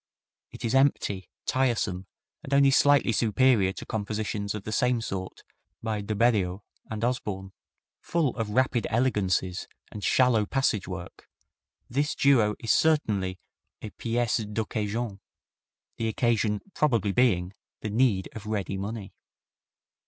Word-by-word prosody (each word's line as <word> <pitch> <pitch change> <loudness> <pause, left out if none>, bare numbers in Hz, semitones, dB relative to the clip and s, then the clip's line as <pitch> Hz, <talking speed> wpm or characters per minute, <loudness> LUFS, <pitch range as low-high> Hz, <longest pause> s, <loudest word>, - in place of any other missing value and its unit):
It - - -8
is 115 - 0
empty, 135 -8 +2 0.2
tiresome 110 -8 0 0.3
and 140 - -1
only 140 -1 +6
slightly 145 -2 +4
superior 115 -2 +3
to - - -8
compositions 105 -1 -3
of 105 - -6
the 110 - -5
same 125 +1 +2
sort 95 -4 -5 0.4
by 110 -2 -2
De 105 +1 -3
Beriot 100 -4 +2 0.3
and 110 0 -4
Osborne. 100 -6 -3 0.5
Full 160 -7 0
of 115 -3 -3
rapid 125 +1 +1
elegancies 100 -6 0 0.2
and 105 - -8
shallow 120 -4 +3
passage 135 -7 0
work, 90 -2 -8 0.6
this 145 +4 -1
duo 120 -7 +4
is 115 - -1
certainly 105 -13 +2 0.5
a 110 - -6
piece 120 0 0
d'occasion 105 0 -3 0.8
the 115 - -1
occasion 110 -2 +1
probably 115 -9 +1
being 95 -6 +2 0.3
the 105 - -4
need 110 -5 +2
of 110 -1 -8
ready 100 -2 -2
money. 100 0 -5
110 Hz, 130 wpm, -27 LUFS, 100-125 Hz, 0.8 s, only